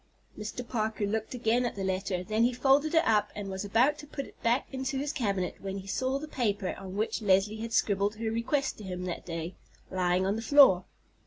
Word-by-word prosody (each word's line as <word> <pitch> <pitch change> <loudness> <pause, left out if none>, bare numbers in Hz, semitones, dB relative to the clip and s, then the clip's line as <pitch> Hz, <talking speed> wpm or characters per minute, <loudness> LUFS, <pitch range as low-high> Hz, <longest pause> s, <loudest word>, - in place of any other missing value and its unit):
Mr. 225 +3 -6
Parker 220 -3 -1
looked 220 +4 -2
again 240 0 +2
at 240 - -2
the 195 - -4
letter, 190 -1 -1
then 215 +4 +1
he 245 +1 +3
folded 280 +5 +3
it 325 - +5
up 215 -2 +3
and 200 -2 -5
was 190 +1 -4
about 245 +9 +2
to 295 - -10
put 275 -1 -5
it - - -17
back 235 +3 +2
into 265 0 -3
his 285 +2 -2
cabinet 200 -9 -1
when 195 0 -4
he 195 - -7
saw 260 +7 -1
the 305 +2 -6
paper 205 -9 -1
on 190 0 -8
which 220 +2 -1
Leslie 200 +1 +3
had 225 +1 -5
scribbled 205 -2 +1
her 220 0 -2
request 235 +5 -1
to - - -8
him 180 -1 -5
that 180 -1 -5
day, 165 +1 -4 0.4
lying 185 0 +1
on 195 +2 +1
the 225 - -3
floor. 230 -8 +6
215 Hz, 225 wpm, -29 LUFS, 195-250 Hz, 0.4 s, floor